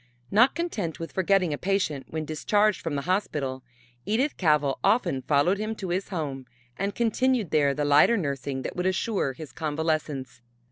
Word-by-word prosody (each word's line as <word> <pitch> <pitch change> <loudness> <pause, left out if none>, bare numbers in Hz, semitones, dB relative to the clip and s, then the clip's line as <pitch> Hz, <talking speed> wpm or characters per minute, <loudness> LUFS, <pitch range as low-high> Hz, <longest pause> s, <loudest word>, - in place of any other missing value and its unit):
Not 240 +6 +5
content 220 - -3
with 165 - -6
forgetting 190 -3 +2
a 145 - -4
patient 185 -8 -1
when 155 -1 -3
discharged 205 +6 +1
from 160 -3 -3
the 140 - -2
hospital, 150 -9 -1 0.4
Edith 250 +8 0
Cavell 150 -5 +2
often 175 - +2
followed 155 +9 +2
him 215 +1 -2
to 190 -4 -6
his 185 +3 -2
home 140 -8 -4 0.3
and 200 +1 -3
continued 240 -2 +1
there 140 -2 +3
the 145 - -1
lighter 145 +11 +5
nursing 140 -5 -3
that - - -5
would 180 +1 0
assure 190 -6 0
his 150 -1 -9
convalescence. 150 -4 -2
165 Hz, 170 wpm, -26 LUFS, 145-200 Hz, 0.4 s, Not